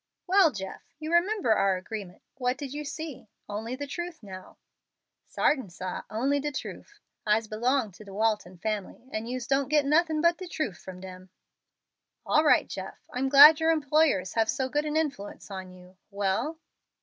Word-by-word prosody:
"Well, 375 -3 +5
Jeff, 190 -4 -7 0.2
you 310 +2 -5
remember 355 - +3
our 195 -3 +2
agreement. 190 -1 -8
What 250 -1 -1
did 280 -2 -6
you 300 +1 -4
see? 295 -6 -7 0.2
Only 220 +4 -4
the 285 +2 -5
truth 345 0 -6
now." 185 -2 -10 0.7
"Sartin, 260 -9 +1
sah, 180 +1 -6
only 270 +6 0
de 295 +1 -2
truf. 415 +8 -8 0.3
I'se 215 +2 +3
belong 230 +2 0
to 190 - -14
de 200 - -12
Walton 210 -3 -1
family, 215 +4 -4
and 220 +2 -3
yous 250 -1 -4
doesn't 275 +1 +1
get 300 -1 +3
nothin' 315 +2 +2
but 340 +2 +3
de 370 - -6
truf 310 - -3
from 185 -1 -10
dem." 185 0 -10 1.0
"All 305 - +3
right, 305 - +4
Jeff; - - -7 0.2
I'm 265 +2 0
glad 290 +3 +10
your 320 0 +2
employers 295 - +2
have 225 -1 +1
so 265 -1 -1
good 295 +3 0
an 305 +1 -1
influence 275 -11 -3
on 190 -1 -6
you. 185 0 -16
Well?" 205 +10 -1
255 Hz, 175 wpm, -28 LUFS, 200-305 Hz, 1.0 s, glad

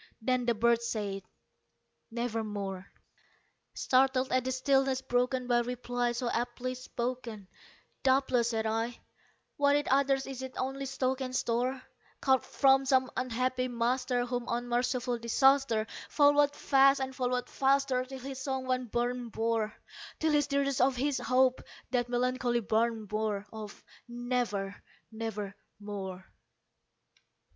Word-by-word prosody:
Then 250 +1 0
the 235 - +3
bird 235 +1 +3
said, 205 -4 -3 0.9
"Nevermore." 210 -5 -3 0.9
Startled 260 0 +2
at 255 -1 +2
the 260 - -2
stillness 265 0 +2
broken 250 +1 0
by 240 -1 +3
reply 245 0 -1
so 240 +1 -2
aptly 245 +2 -2
spoken, 245 -4 -5 0.5
"Doubtless," 260 -3 +3
said 225 -2 -1
I, 225 +2 -1 0.6
"what 285 0 +4
it 290 0 +1
utters 270 0 +3
is 265 -1 -6
its 260 -1 -7
only 270 +1 -3
stock 265 0 -1
and 255 -1 -3
store, 250 +2 0 0.4
Caught 265 -2 +2
from 270 -1 +4
some 260 -1 +3
unhappy 255 +1 -1
master 245 +1 0
whom 245 -1 -3
unmerciful 245 +1 -1
Disaster 250 -1 +3 0.2
Followed 290 0 +4
fast 275 0 +4
and 265 0 -3
followed 250 -1 -1
faster 270 -1 +2
till 265 +1 -8
his 265 0 -6
songs 265 -1 -2
one 255 0 +1
burden 240 +1 -2
bore 225 -1 0 0.5
Till 315 0 +1
the 295 -1 +4
dirges 280 -2 0
of 260 +1 +3
his 275 +2 0
Hope 255 0 +2 0.3
that 245 -1 0
melancholy 245 0 0
burden 225 +1 0
bore 210 -1 -2
Of 215 -2 -8 0.2
'Never 240 -5 -2 0.3
nevermore.'" 205 -3 -6
250 Hz, 130 wpm, -30 LUFS, 230-265 Hz, 0.9 s, what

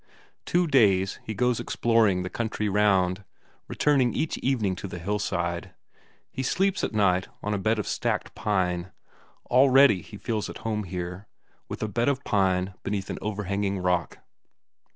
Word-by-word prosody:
Two 175 +1 +2
days 100 - +3
he 110 - -5
goes 125 0 +1
exploring 110 -6 +2
the 90 - -4
country 110 -2 -2
round, 100 -2 +2 0.4
returning 135 -5 +2
each 160 - -1
evening 110 -8 0
to 100 - -6
the 90 - -7
hillside. 85 -2 -2 0.6
He - - -4
sleeps 195 +9 0
at - - 0
night 100 -3 +2 0.2
on 105 - -1
a 100 - -1
bed 110 +3 +1
of 105 - -2
stacked - - -2
pine; 90 -3 -1 0.6
already 130 -5 +6
he 105 - -11
feels 110 0 -3
at - - -7
home 105 -2 -1
here, 90 +2 -6 0.4
with - - -5
a - - 0
bed 115 +5 0
of 140 0 -1
pine 95 -4 +1
beneath 100 -1 -3
an - - -5
overhanging 100 -1 -2
rock. 90 -2 -1
105 Hz, 155 wpm, -26 LUFS, 95-115 Hz, 0.6 s, already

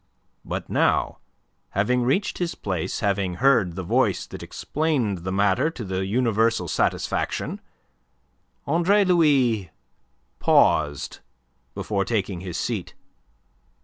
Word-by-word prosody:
But - - -5
now, - - +1 0.6
having 125 +5 +2
reached 135 +12 0
his 175 -2 -2
place, 90 -5 -3
having 100 -3 0
heard 115 -8 +3
the 95 - -4
voice - - +1
that - - -9
explained 135 - -1
the 95 +2 -4
matter 100 +9 +2
to 145 -7 -7
the 95 0 -2
universal 115 0 +1
satisfaction, - - -1 1.0
Andre 175 +7 +3
Louis 135 - +3 0.7
paused 75 -2 +2 0.6
before 100 -2 -1
taking 100 -3 -2
his 90 -3 -5
seat. - - -3
110 Hz, 110 wpm, -24 LUFS, 95-140 Hz, 1.0 s, heard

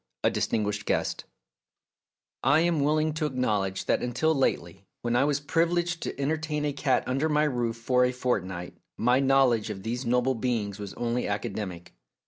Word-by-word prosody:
A - - +4
DISTINGUISHED 105 -1 -1
GUEST - - -1 1.2
1 155 - +5
AM 170 -2 +2
willing 155 +2 +2
to 155 0 -1
acknowledge 105 -8 -1
that - - +1
until 140 +6 +1
lately, 95 - -1 0.2
when 120 0 0
I 135 - +4
was 145 -1 +1
privileged 170 +3 0
to - - -5
entertain 150 +1 -1
a 145 - -1
cat 135 -1 +1
under 135 +5 0
my 150 0 +3
roof 120 -6 0
for 125 +2 +2
a 125 - +3
fortnight, 95 -9 -2 0.2
my 125 +2 +3
know 135 0 +5
ledge 115 -3 0
of 95 -2 -6
these 120 +3 -3
noble 125 +2 +2
beings 110 -4 -2
was 100 -2 -7
only 120 +1 -1
academic. 100 -4 -4
125 Hz, 170 wpm, -27 LUFS, 110-150 Hz, 1.2 s, 1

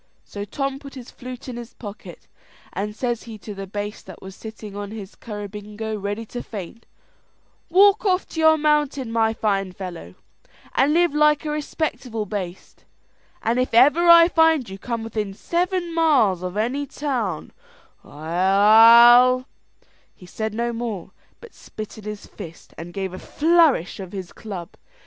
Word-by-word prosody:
So 205 0 -7
Tom 275 +5 -3
put 275 -1 -12
his 250 -2 -10
flute 250 0 -9
in 245 -2 -6
his 240 0 -9
pocket, 205 -2 -10 0.5
and 210 +1 -4
says 240 -1 -2
he 220 - -8
to 210 0 -9
the 195 0 -7
baste 205 +1 -6
that 185 - -10
was 190 0 -11
sittin' 220 -2 -10
on 205 0 -5
his 205 -3 -8
currabingo 210 0 -7
ready 205 +2 -4
to 245 +3 -6
faint, 210 +2 -9 0.8
"Walk 395 +3 +5
off 370 -3 +1
to 320 - -6
your 315 0 +5
mountain, 295 -5 +1
my 225 -1 +2
fine 195 -4 -1
fellow, 175 - -8 0.6
and 270 +3 +3
live 345 -1 +3
like 300 0 +3
a 300 - -2
respectable 285 -7 -3
baste; 190 -3 -7 0.6
and 235 +3 +1
if 255 -2 -1
ever 295 +8 +5
I 335 0 +9
find 320 -6 +3
you 195 0 -9
come 230 0 -4
within 215 -3 -4
seven 350 - -1
miles 270 - +3
of 180 +2 -5
any 260 +7 -1
town, 245 - -3 0.5
I'll 225 - +6 0.4
" - - -36
He 180 - -15
said 220 +4 -4
no 235 +1 -1
more, 225 -6 -5 0.3
but 470 - -14
spit 215 0 -9
in 210 - -13
his 210 -1 -6
fist, 165 -1 -12
and 170 +1 -8
gave 190 -1 -4
a 185 - -7
flourish 315 - +2
of 190 -1 -8
his 190 -3 -7
club. 190 -6 -8
225 Hz, 165 wpm, -22 LUFS, 200-280 Hz, 0.8 s, I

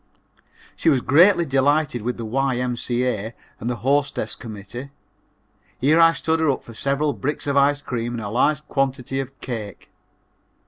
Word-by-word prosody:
She - - +2
was 135 -5 +3
greatly 170 +6 +5
delighted 140 -2 +1
with 120 +3 -3
the 115 - -5
Y.M.C.A. 125 -2 -1 0.2
and 115 - -3
the 125 - -1
Hostess 135 -5 +1
Committee. 115 +4 -8 0.9
Here 150 +5 +4
I 165 0 +7
stood 160 0 0
her 160 -2 +2
up 135 - -1
for 115 - -12
several 140 +5 0
bricks 145 +3 -3
of 140 -1 -1
ice 145 +1 +3
cream 120 -1 -3
and 115 - -5
a 100 - -4
large 150 +7 +1
quantity 135 -1 -1
of 135 0 -6
cake. 110 -7 -7
135 Hz, 155 wpm, -22 LUFS, 120-145 Hz, 0.9 s, I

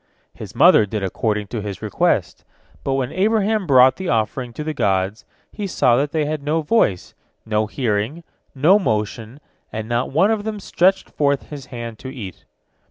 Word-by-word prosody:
His - - -10
mother 105 - +6
did 105 0 -3
according 105 +2 -1
to 115 - -4
his 100 -2 -6
request, - - 0 0.4
but 135 - 0
when 130 -1 -1
Abraham 215 0 +1
brought 130 -1 +6
the 190 -1 -4
offering 120 +2 -1
to 150 - -5
the 155 0 -3
gods, 95 -3 -1 0.3
he 205 -2 -4
saw 125 -9 +3
that 140 +3 0
they 155 -2 0
had 155 0 -3
no 155 +3 -1
voice, 145 - +1 0.3
no 110 -1 0
hearing, 115 +6 -2 0.3
no 165 +10 +5
motion, 110 - -2 0.3
and 110 0 -5
not 120 +2 -1
one 185 +10 +3
of 215 -2 -1
them 215 -1 -4
stretched 190 0 +1
forth 140 -1 0
his 140 -3 -8
hand 115 -3 -7
to - - -8
eat. 110 -9 -9
130 Hz, 175 wpm, -20 LUFS, 110-160 Hz, 0.4 s, mother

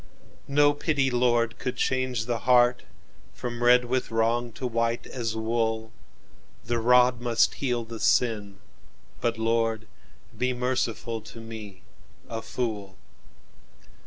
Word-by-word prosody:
"No 145 +1 +4
pity, 145 -3 0
Lord, 120 -1 +1
could 125 -1 -3
change 130 -3 0
the 120 -1 -1
heartFrom 120 0 0
red 125 0 +5
with 125 +1 -1
wrong 115 +1 0
to 130 - -6
white 115 -1 -1
as 115 -3 -4
wool; 110 0 -1 0.7
The 120 0 -1
rod 125 +1 +4
must 120 -2 +2
heal 125 -4 -1
the 115 0 -8
sin: 105 -6 +1 0.6
but, 115 -1 -1
Lord, 115 0 0 0.5
Be 125 0 0
merciful 120 -2 -2
to 115 - -11
me, 110 -4 -9 0.4
a 115 -1 -4
fool! 110 -5 -4
120 Hz, 120 wpm, -26 LUFS, 115-125 Hz, 0.7 s, red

